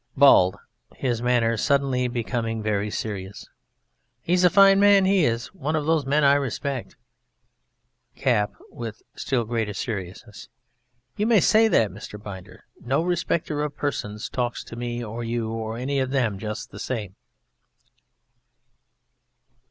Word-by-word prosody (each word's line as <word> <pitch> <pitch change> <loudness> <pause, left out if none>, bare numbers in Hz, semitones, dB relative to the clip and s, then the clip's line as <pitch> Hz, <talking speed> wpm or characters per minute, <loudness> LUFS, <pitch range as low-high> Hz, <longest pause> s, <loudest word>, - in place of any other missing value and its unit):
BALD 115 -10 +6 0.4
(his 120 -3 -2
manner 120 -2 +2
suddenly 135 -1 +1
becoming 115 -1 -3
very 105 -1 -1
serious): 100 -2 -5 0.7
He's 180 +1 +1
a 180 - +7
fine 195 +1 +6
man, 200 -1 +6
he 190 -4 +3
is! 115 +5 -2
One 155 -4 -2
of 150 -2 -1
those 155 -3 +1
men 145 +2 +2
I 140 0 +6
respect. 140 -1 -2 1.2
CAP 115 -6 +1 0.2
(with 115 -3 -7
still 130 -4 -1
greater 110 -3 -2
seriousness): 100 0 -6 0.7
You 210 +1 +1
may 230 -3 +5
say 220 +5 +5
that, 110 - +2
Mr. 105 +2 -9
Binder. 95 -3 -10 0.2
No 135 +6 +1
respecter 170 -4 -1
of 150 -1 -4
persons 105 -7 -3
talks 120 -1 -3
to - - -10
me 120 0 -4
or 115 +2 -5
you 115 -1 -2
or 110 0 -4
any 135 +3 -1
of 130 -1 0
them 120 -8 0
just 105 +1 -6
the - - -10
same. 105 -7 -4
120 Hz, 140 wpm, -24 LUFS, 110-145 Hz, 1.2 s, a